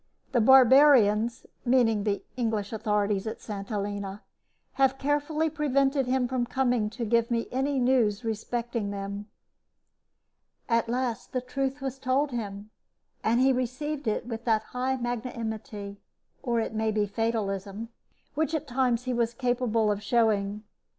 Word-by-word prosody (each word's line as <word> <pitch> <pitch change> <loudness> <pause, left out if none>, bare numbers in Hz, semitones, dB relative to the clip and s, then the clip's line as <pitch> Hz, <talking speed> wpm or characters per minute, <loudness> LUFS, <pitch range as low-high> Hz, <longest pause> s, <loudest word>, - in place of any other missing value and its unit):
The 245 -3 +3
barbarians 245 -3 +6 0.2
(meaning 235 -5 +3
the 205 -1 -1
English 225 -4 -1
authorities 210 -2 0
at 220 - -5
St. 200 -2 -7
Helena) 205 -1 -4 0.5
have 270 0 +2
carefully 290 +3 0
prevented 275 -3 +1
him 255 -1 +1
from 245 -1 -1
coming 245 -4 +1
to 235 +2 -4
give 230 +1 +2
me 230 -1 0
any 270 +2 0
news 245 -4 +2
respecting 230 0 -2
them." 200 +1 -5 1.4
At 230 -1 +1
last 245 -2 -2
the 255 - +1
truth 270 +2 -3
was 270 0 -4
told 270 +3 +1
him, 210 -3 -5 0.5
and 230 +2 +2
he 265 0 +5
received 255 +3 -3
it 215 - 0
with 230 -1 -5
that 220 -2 +2
high 255 +3 -2
magnanimity, 220 -4 -5 0.4
or 235 -3 0
it 225 - -2
may 220 0 0
be 210 -1 +1
fatalism, 205 -1 -2 0.4
which 315 +1 0
at 310 - -2
times 250 -2 +1
he 255 -1 -2
was 235 -1 0
capable 240 -4 +1
of 205 0 -2
showing. 210 -2 +1
235 Hz, 145 wpm, -27 LUFS, 215-260 Hz, 1.4 s, barbarians